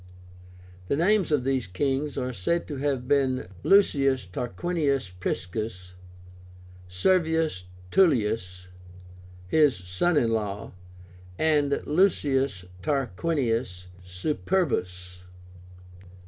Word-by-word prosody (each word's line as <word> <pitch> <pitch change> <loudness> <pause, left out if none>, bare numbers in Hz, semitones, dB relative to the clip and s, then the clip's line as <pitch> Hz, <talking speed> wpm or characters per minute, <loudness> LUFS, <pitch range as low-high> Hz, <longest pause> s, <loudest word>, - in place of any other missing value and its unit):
The - - +1
names 185 +3 +2
of 145 -4 +2
these 130 -3 0
kings 135 +10 -1
are 125 -1 -2
said 170 - -1
to 145 - -4
have 135 -3 -1
been 135 -5 +1
LUCIUS 135 - +3
TARQUINIUS 140 - -1
PRISCUS, 90 +1 -4 0.9
SERVIUS 160 - +1 0.3
TULLIUS, 105 - +2 0.8
his 150 +3 +4
son 90 - 0
in 115 -5 +2
law, 105 -2 -3 0.7
and 145 -3 +1
LUCIUS 140 - +1 0.2
TARQUINIUS 120 - -1 0.2
SUPERBUS. 90 - -2
135 Hz, 85 wpm, -26 LUFS, 95-150 Hz, 0.9 s, his